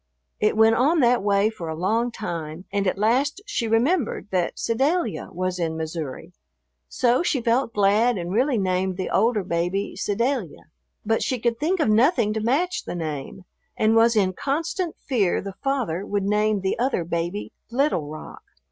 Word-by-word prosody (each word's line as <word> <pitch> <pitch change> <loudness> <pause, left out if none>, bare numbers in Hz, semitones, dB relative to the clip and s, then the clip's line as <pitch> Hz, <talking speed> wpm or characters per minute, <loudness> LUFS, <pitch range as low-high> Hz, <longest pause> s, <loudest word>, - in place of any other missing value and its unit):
It 215 0 +1
went 220 0 +6
on 290 +8 +3
that 245 -2 +4
way 200 +1 +2
for 170 -7 -7
a 160 - -3
long 220 +8 0
time 170 -6 -6
and 200 -1 0
at 185 - 0
last 255 - +1
she 410 - -2
remembered 235 - +1
that 180 -2 0
Sedalia 265 - 0
was 185 0 -3
in 160 -2 -1
Missouri, 160 -3 -5 0.6
so 245 +2 +2
she 315 -6 +1
felt 235 +1 +1
glad 210 +3 +3
and 175 0 -4
really 250 +3 +2
named 185 -1 0
the 185 - -3
older 220 -3 +2
baby 175 +3 -2
"Sedalia." 235 - -2 0.4
But 225 +1 +1
she 255 - 0
could 235 0 -1
think 350 +5 0
of 305 - +2
nothing 230 - +3
to 220 - -2
match 320 +11 0
the - - -5
name 155 +2 -5 0.3
and 220 +1 +3
was 230 +1 +5
in 190 -3 +2
constant 325 - -2
fear 215 -10 0
the 195 0 -6
father 245 -11 -1
would 205 -1 -2
name 210 0 +1
the 190 +3 -1
other 250 -8 +1
baby 170 +4 -3 0.2
"Little 235 - 0
Rock." 155 0 -9
215 Hz, 175 wpm, -24 LUFS, 185-245 Hz, 0.6 s, went